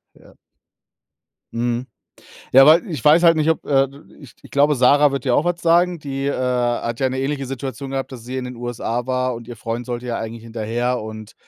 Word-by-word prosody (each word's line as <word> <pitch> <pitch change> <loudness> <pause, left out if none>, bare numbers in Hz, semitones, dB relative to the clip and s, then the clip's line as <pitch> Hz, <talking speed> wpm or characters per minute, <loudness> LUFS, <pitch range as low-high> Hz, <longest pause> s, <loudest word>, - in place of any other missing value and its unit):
Ja. - - -20 1.2
Mhm, 120 +1 -1 0.7
ja, 135 +1 +8
weil 165 +7 +5
ich 150 -8 -5
weiß 155 +3 +6
halt 165 -2 +5
nicht 155 0 +2
ob, 160 - -4
äh 135 -1 +2
d-d 140 +2 -17
ich 140 -5 -14
ich - - -15
glaube, 145 +1 +3
Sarah 140 +3 +4
wird 140 +1 -4
dir 125 -2 +2
auch 155 - +1
was 175 0 -1
sagen. 175 +1 +3
Die, 135 -2 -4
äh, 140 - +1
hat 120 -2 -1
ja 130 - +2
'ne 130 0 -3
ähnliche 135 0 -2
Situation 135 +1 -6
gehabt, 135 0 -3
dass 125 -3 -9
sie 125 +2 -6
in 130 -1 -3
den 125 0 -7
USA 120 0 -3
war 130 -1 -1
und 115 0 -10
ihr 120 - -8
Freund 115 +2 -5
sollte 125 0 -5
ja 120 - -2
eigentlich 115 0 -6
hinterher 115 +2 -2
und, 110 0 -9
130 Hz, 220 wpm, -20 LUFS, 120-140 Hz, 1.2 s, ja